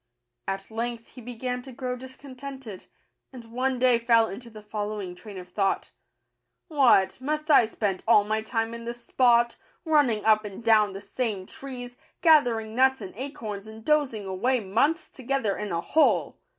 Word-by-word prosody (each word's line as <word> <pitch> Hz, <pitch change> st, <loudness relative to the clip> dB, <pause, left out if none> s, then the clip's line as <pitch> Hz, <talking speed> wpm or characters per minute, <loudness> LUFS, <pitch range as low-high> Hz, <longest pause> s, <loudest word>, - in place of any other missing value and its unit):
At 195 Hz, +2 st, -4 dB
length 230 Hz, +1 st, -4 dB
he 250 Hz, -, -12 dB
began 250 Hz, +1 st, -4 dB
to 265 Hz, +1 st, -11 dB
grow 250 Hz, 0 st, -4 dB
dis 260 Hz, +1 st, -11 dB
contented, 265 Hz, -6 st, -9 dB, 0.4 s
and 235 Hz, -3 st, -12 dB
one 255 Hz, +2 st, 0 dB
day 250 Hz, -1 st, +4 dB
fell 230 Hz, -1 st, +4 dB
into 235 Hz, +4 st, -8 dB
the 215 Hz, -2 st, -12 dB
following 210 Hz, -3 st, -4 dB
train 200 Hz, +2 st, -11 dB
of 180 Hz, -1 st, -9 dB
thought: 195 Hz, +1 st, -1 dB, 0.3 s
— -, -, -53 dB
" -, -, -54 dB
What, 260 Hz, -, +4 dB
must 305 Hz, +3 st, -1 dB
I 240 Hz, -6 st, +6 dB
spend 205 Hz, -4 st, -2 dB
all 215 Hz, -3 st, +6 dB
my 215 Hz, +1 st, -1 dB
time 225 Hz, 0 st, -2 dB
in 235 Hz, 0 st, -8 dB
this 240 Hz, 0 st, -7 dB
spot, 240 Hz, -2 st, +3 dB, 0.3 s
running 285 Hz, -10 st, +2 dB
up 215 Hz, -1 st, +5 dB
and 210 Hz, +2 st, -8 dB
down 215 Hz, -3 st, +4 dB
the 195 Hz, -, -7 dB
same 205 Hz, -2 st, -3 dB
trees, 245 Hz, 0 st, -9 dB, 0.2 s
gathering 245 Hz, -9 st, +4 dB
nuts 265 Hz, +2 st, +3 dB
and 190 Hz, -2 st, -7 dB
acorns, 225 Hz, -6 st, -6 dB
and 220 Hz, 0 st, -11 dB
dozing 280 Hz, -9 st, +1 dB
away 225 Hz, +8 st, 0 dB
months 230 Hz, -, +1 dB
together 260 Hz, -5 st, -2 dB
in 210 Hz, -2 st, -5 dB
a 170 Hz, 0 st, -1 dB
hole! 315 Hz, -, +2 dB
235 Hz, 175 wpm, -26 LUFS, 210-260 Hz, 0.4 s, I